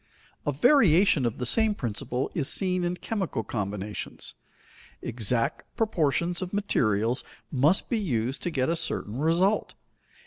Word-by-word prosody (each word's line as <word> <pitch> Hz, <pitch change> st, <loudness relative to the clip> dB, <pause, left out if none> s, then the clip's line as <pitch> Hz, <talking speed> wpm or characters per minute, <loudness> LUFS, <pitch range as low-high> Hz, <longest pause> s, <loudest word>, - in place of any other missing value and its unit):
A -, -, +3 dB
variation 180 Hz, -, +5 dB
of 115 Hz, -, -4 dB
the 125 Hz, -, -2 dB
same 220 Hz, -, +3 dB
principle 125 Hz, -, -3 dB
is 140 Hz, -5 st, 0 dB
seen 185 Hz, -2 st, +1 dB
in 175 Hz, +1 st, 0 dB
chemical 190 Hz, -, -2 dB
combinations. 105 Hz, -1 st, -4 dB, 0.7 s
Exact 115 Hz, +1 st, -1 dB, 0.2 s
proportions 175 Hz, -4 st, +1 dB
of 185 Hz, +1 st, -5 dB
materials 115 Hz, -, +1 dB, 0.3 s
must 150 Hz, +7 st, +3 dB
be 235 Hz, -, 0 dB
used 130 Hz, -, -1 dB
to 175 Hz, -, -1 dB
get 130 Hz, -6 st, 0 dB
a 165 Hz, -, +1 dB
certain 130 Hz, -8 st, -2 dB
result. 175 Hz, +7 st, +2 dB
155 Hz, 135 wpm, -27 LUFS, 120-185 Hz, 0.7 s, variation